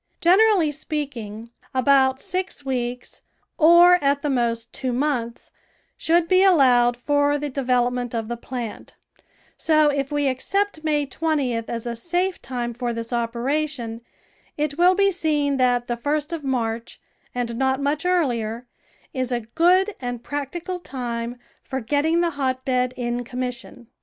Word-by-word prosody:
Generally 375 -2 +4
speaking, 245 -8 -5 0.2
about 265 0 +4
six 370 -4 -3
weeks, 250 -2 -4 0.4
or 345 +1 +7
at 280 0 +1
the 295 - 0
most 235 -2 -1
two 260 -1 -3
months, 245 -3 -2 0.4
should 335 +1 +2
be 370 +1 +4
allowed 250 -9 +5
for 290 +3 +1
the 290 0 -4
de 275 - -3
velopment 245 -1 0
of 225 -1 -2
the 240 - -3
plant; 235 -2 -7 0.6
so 310 -2 +3
if 280 -1 -2
we 290 -1 +1
accept 325 +7 -1
May 300 -2 +1
20th 270 -6 -1
as 230 0 -4
a 235 -1 -3
safe 355 +9 -1
time 240 -2 -4
for 240 0 -3
this 230 +1 -5
operation, 240 +1 -2 0.6
it 295 -1 -1
will 355 +3 +5
be 395 0 +3
seen 300 -5 0
that 245 -1 +2
the 240 0 -3
first 300 +5 -2
of 325 -3 -4
March, 235 -3 -2 0.4
and 240 -1 -2
not 265 +2 +1
much 285 +1 -1
earlier, 245 -10 0 0.5
is 255 -1 -2
a 240 -1 0
good 355 - +2
and 245 -2 -5
practical 325 +6 -4
time 240 -5 -5 0.2
for 265 - -4
getting 295 +7 +1
the 340 -1 +1
hotbed 255 -2 -1
in 240 0 -2
com 250 +1 -6
mission. 250 -1 -6
265 Hz, 150 wpm, -23 LUFS, 240-310 Hz, 0.6 s, or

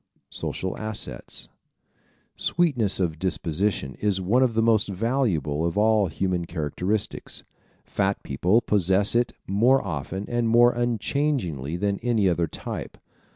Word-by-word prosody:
Social 95 - -3
Assets 110 -1 -3 0.9
¶ - - -12
Sweetness 130 - +2
of 80 -4 -1
disposition 90 -4 -1
is 100 -2 +1
one 105 +8 +2
of 125 -4 +2
the 115 - +3
most 110 -2 +3
valuable 100 - 0
of 85 +3 -1
all 105 -1 +3
human 90 0 -1
characteristics. 90 +6 -3 0.4
Fat - - -1
people 90 - +2
possess 100 -1 +2
it 120 0 +1
more 115 +6 +3
often 90 +4 -4
and 120 -1 0
more 120 +1 +6
unchangingly 120 - -1
than 100 +1 -1
any 115 -5 +1
other 85 -2 +1
type. - - -6
100 Hz, 130 wpm, -25 LUFS, 90-115 Hz, 0.9 s, more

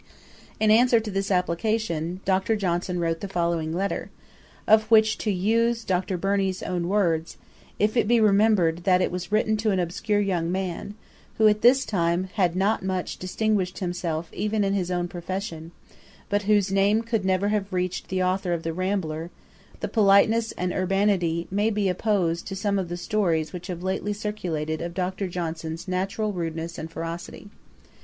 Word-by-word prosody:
] - - -25
In 215 -1 +4
answer 235 +1 +5
to 220 -1 -5
this 195 +1 -2
application, 180 -1 -1
Dr. 190 +3 +2
Johnson 180 -2 -1
wrote 165 -1 -1
the 200 - -5
following 170 -4 -1
letter, 190 +4 -2 0.6
of 220 0 +4
which 220 -1 +5
(to 215 - -2
use 230 +5 +1
Dr. 185 -1 -1
Burney's 195 0 0
own 175 -1 -2
words) 170 -5 0 0.4
'if 210 +2 +1
it 235 - +2
be 235 +1 +4
remembered 205 -5 +4
that 185 -2 +4
it - - -1
was 180 +1 -5
written 215 0 +2
to 215 +1 0
an 190 -2 +1
obscure 180 +4 0
young 175 -4 0
man, 190 +2 -3 0.4
who 220 - +5
at 210 0 +3
this 260 +3 +5
time 175 -1 0
had 180 -5 +1
not 200 +4 +1
much 185 -1 -3
distinguished 190 0 -1
himself 175 -3 -3
even 210 +1 0
in 195 0 +1
his 185 -3 -1
own 175 -1 -1
profession, 175 -2 -5 0.6
but 205 0 +1
whose 205 -2 +3
name 200 +3 +3
could 225 -3 -1
never 190 +1 +1
have 205 -1 -1
reached 180 -1 -2
the 185 0 -1
authour 185 0 0
of 165 -1 -3
The 165 - -2
Rambler, 175 -3 -2 0.5
the - - -1
politeness 220 +2 +4
and 180 0 -2
urbanity 185 -3 +1
may 205 +3 +2
be 210 -2 0
opposed 180 -3 0
to 195 - -5
some 200 +1 0
of 180 -3 -3
the 175 - -4
stories 175 -6 0
which 175 -1 -7
have 175 -2 -5
been - - -7
lately 205 +2 -1
circulated 175 -7 -3
of 170 0 -5
Dr. 185 +1 -2
Johnson's 165 -2 -5
natural 195 +3 -1
rudeness 165 -1 -4
and 160 - -6
ferocity.' 165 +5 -7
190 Hz, 180 wpm, -25 LUFS, 175-210 Hz, 0.6 s, answer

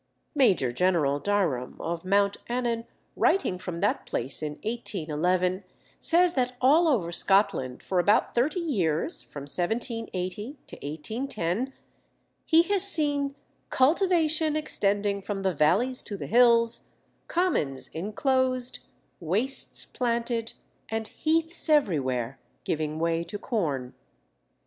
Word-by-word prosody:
Major 195 - +3
General 150 -2 +1
Dirom, 165 -10 -1
of 165 0 -4
Mount 200 +1 +2
Annan, 235 -1 -2 0.3
writing 195 - +1
from 175 -2 -6
that 205 - 0
place 130 +5 -2
in 150 -1 -3
1811, 185 -4 -1 0.4
says 345 +1 +4
that 250 -3 -1
all 305 +7 +4
over 205 - +1
Scotland 195 -9 +1
for 185 - 0
about 205 +4 +2
thirty 275 +9 +1
years 190 - 0
(from 140 - -10
1780 195 - -2 0.3
1810) 215 - -3 0.8
he 330 +1 +6
has 395 +1 0
seen 290 -7 +2 0.3
"cultivation 315 +1 +2
extending 205 -8 0
from 195 0 -4
the 190 -1 +1
valleys 195 - +3
to 205 - -7
the - - -6
hills, 235 0 +4 0.4
commons 155 - 0
inclosed, 255 - -1 0.4
wastes 205 - -2
planted, 235 -1 -2 0.4
and 220 -1 -3
heaths 325 +1 +3
everywhere 135 - +1 0.3
giving 155 -1 -2
way 165 0 0
to 170 +5 -6
corn 150 - -2
205 Hz, 110 wpm, -27 LUFS, 170-260 Hz, 0.8 s, he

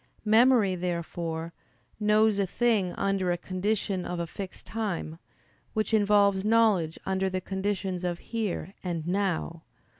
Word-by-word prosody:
Memory, 220 -2 +5
therefore, 170 -2 -3 0.5
knows 210 0 +3
a 195 - +1
thing 210 -3 +1
under 195 -2 0
a 175 - 0
condition 190 +1 -1
of 175 0 -4
a 170 - -1
fixed 190 +3 -8
time; 175 -7 -3 0.5
which 215 +1 -1
involves 200 -2 +4
knowledge 210 -7 +3
under 190 0 0
the 185 0 -2
conditions 190 -1 -2
of 175 -1 -1
"here" 205 -4 -4
and 170 -4 -3
"now." 180 -3 -1
190 Hz, 130 wpm, -28 LUFS, 175-210 Hz, 0.5 s, Memory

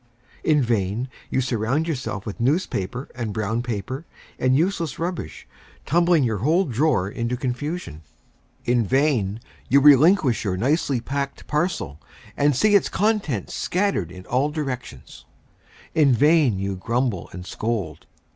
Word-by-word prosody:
In 150 -3 +3
vain 115 +1 -1 0.2
you 130 - +1
surround 125 +5 0
yourself 130 - -3
with 105 +1 -6
newspaper 125 - -1
and 120 -3 -4
brown 110 +2 -1
paper, 120 - -5 0.3
and 130 +1 +3
useless 165 -3 0
rubbish, 170 - -5 0.4
tumbling 170 -1 +3
your 110 -5 0
whole 165 - +2
drawer 130 -6 +1
into 115 +4 -3
confusion. 130 - -4 0.6
In 120 -1 +2
vain 120 -4 +1 0.3
you 140 - +6
relinquish 145 - +5
your 95 -4 -1
nicely 135 - +1
packed 140 +2 -4
parcel, 150 - -2 0.3
and 145 -1 +2
see 210 - +3
its 200 - +4
contents 195 - 0
scattered 180 - -1
in 90 0 -11
all 130 +7 +1
directions. 130 - -6 0.7
In 145 -4 +4
vain 145 - +4
you 95 0 -3
grumble 115 -1 -1
and 90 0 -8
scold. 100 -8 -4
130 Hz, 135 wpm, -23 LUFS, 110-150 Hz, 0.7 s, you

